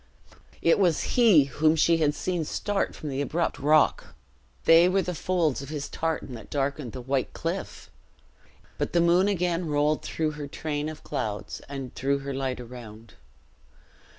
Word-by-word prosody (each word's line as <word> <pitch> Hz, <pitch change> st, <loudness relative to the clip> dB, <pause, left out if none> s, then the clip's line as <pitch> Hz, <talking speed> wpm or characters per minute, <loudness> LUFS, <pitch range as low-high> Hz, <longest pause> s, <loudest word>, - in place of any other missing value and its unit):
It 165 Hz, -, +4 dB
was 175 Hz, -5 st, +1 dB
he 220 Hz, -, +6 dB
whom 155 Hz, +4 st, +2 dB
she 165 Hz, +1 st, +4 dB
had 150 Hz, -2 st, +1 dB
seen 180 Hz, -3 st, -2 dB
start 200 Hz, +6 st, -2 dB
from 150 Hz, -, -6 dB
the 135 Hz, 0 st, -2 dB
abrupt 165 Hz, +4 st, -1 dB
rock! 150 Hz, +2 st, +2 dB, 0.5 s
They 165 Hz, +2 st, +7 dB
were 190 Hz, +1 st, +2 dB
the 180 Hz, -, -3 dB
folds 170 Hz, -5 st, 0 dB
of 140 Hz, -, -8 dB
his 150 Hz, -2 st, -4 dB
tartan 160 Hz, -5 st, -3 dB
that 115 Hz, -3 st, -10 dB
darkened 140 Hz, -3 st, -2 dB
the 130 Hz, -, -6 dB
white 130 Hz, +1 st, -1 dB
cliff! 170 Hz, +3 st, -5 dB, 0.9 s
But -, -, -2 dB
the 175 Hz, -, +4 dB
moon 175 Hz, +3 st, +4 dB
again 180 Hz, -3 st, 0 dB
rolled 150 Hz, 0 st, +1 dB
through 155 Hz, -1 st, -2 dB
her 150 Hz, -1 st, -7 dB
train 150 Hz, +1 st, -3 dB
of 155 Hz, -1 st, -10 dB
clouds 105 Hz, -1 st, -4 dB
and 135 Hz, -3 st, -6 dB
threw 140 Hz, +1 st, 0 dB
her 140 Hz, 0 st, -5 dB
light 130 Hz, -1 st, -2 dB
around. 115 Hz, -3 st, -11 dB
150 Hz, 165 wpm, -26 LUFS, 135-170 Hz, 0.9 s, They